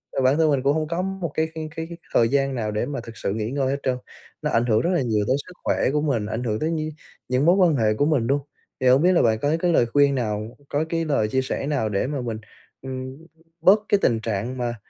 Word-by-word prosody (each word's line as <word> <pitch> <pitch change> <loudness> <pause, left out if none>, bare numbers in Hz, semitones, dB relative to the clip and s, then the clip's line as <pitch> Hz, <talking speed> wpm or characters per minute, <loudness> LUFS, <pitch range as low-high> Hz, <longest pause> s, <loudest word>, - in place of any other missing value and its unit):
mà - - +1
bản 135 +4 +4
thân 160 -1 +3
mình 135 -2 +1
cũng 140 +1 +3
hông 155 -1 -1
có 170 +2 -1
một 190 -4 -3
cái 160 0 0
cái 155 -1 -5
cái 160 0 -4
cái 170 - -8 0.2
thời 115 -1 +4
gian 135 -1 +1
nào 110 -3 -2
để 105 - -1
mà 140 -3 -4
thực 115 -2 -11
sự 100 - -2
nghỉ 110 +2 -3
ngơi 135 -1 0
hết 140 - -2
trơn, 130 -1 0 0.4
nó - - -1
ảnh 115 +1 +2
hưởng 110 -1 +3
rất 175 - 0
là 170 - +2
nhiều 110 -4 0
tới 130 - +3
sức 180 - -11
khỏe - - +1
của 150 - +1
mình, 130 -9 0
ảnh 110 +3 -3
hưởng 110 -2 -1
tới 160 +2 -1
nh 155 -1 -2 0.4
những 130 +4 +2
mối 175 +2 +6
quan 180 -5 +4
hệ 110 -4 +2
của 145 +7 +1
mình 140 -7 +1
luôn. 140 +1 +1 0.4
Thì 130 - +2
hông 130 +3 +6
biết 180 - +5
là 180 - +4
bạn 110 -1 +2
có 145 +6 +1
cái 175 -1 +1
lời 120 - +4
khuyên 140 +3 +3
nào, 110 -2 -3
có 150 +2 0
cái 165 -1 -1
lời 140 -8 +1
chia 130 +4 0
sẻ 135 +1 -3
nào 135 -7 0
để 105 +4 0
mà 140 -3 -3
mình, 115 -3 -3 0.4
ừm, 130 0 -6 0.4
bớt 190 +5 +6
cái 205 - +5
tình 115 -1 +2
trạng 115 +4 -3
mà, 120 -1 -2
135 Hz, 280 wpm, -23 LUFS, 115-155 Hz, 0.4 s, mối